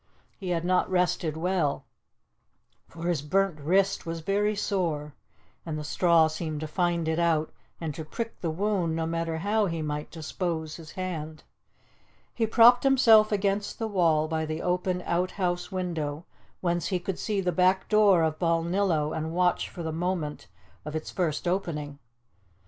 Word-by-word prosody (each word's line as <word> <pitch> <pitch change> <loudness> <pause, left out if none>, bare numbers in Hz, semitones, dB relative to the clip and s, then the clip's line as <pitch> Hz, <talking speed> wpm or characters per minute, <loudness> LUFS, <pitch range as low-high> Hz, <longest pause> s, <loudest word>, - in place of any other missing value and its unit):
He 190 -3 -5
had 170 -1 -1
not 185 0 +2
rested 180 -3 0
well, 170 -4 0 1.0
for 165 - -10
his 170 -5 0
burnt 185 +2 0
wrist 190 +6 +2
was 165 0 -5
very 205 +4 +1
sore, 165 -8 -2 0.5
and 160 -2 -4
the 150 - -4
straw 170 +1 +4
seemed 155 -1 -3
to 155 - -3
find 170 0 0
it 160 +1 0
out 165 -2 +1 0.3
and 160 -3 -3
to 160 - -6
prick 230 +9 -6
the 170 - -1
wound, 180 -1 0
no 165 0 -1
matter 165 0 -2
how 205 +5 +1
he 165 -2 -3
might 150 0 -4
dispose 160 -1 -4
his 160 -3 -11
hand. 160 -4 -5 0.9
He 225 -2 0
propped 235 +2 +6
himself 230 -6 +6
against 200 0 0
the 225 - -2
wall 165 -6 +2
by 160 0 -1
the 155 0 -4
open 180 0 0
outhouse 180 0 -1
window, 165 -4 -3 0.4
whence 175 -2 0
he 185 - 0
could 175 +1 -4
see 210 -2 -1
the 180 -2 0
back 185 +2 +2
door 205 -5 +5
of 155 -1 -1
Balnillo 165 -2 +1
and 160 +1 -3
watch 180 0 +1
for 170 - -7
the 160 - -2
moment 165 - -3 0.4
of 150 +1 -6
its 155 - -4
first 175 -1 -1
opening. 150 -6 -2
170 Hz, 165 wpm, -27 LUFS, 160-190 Hz, 1.0 s, propped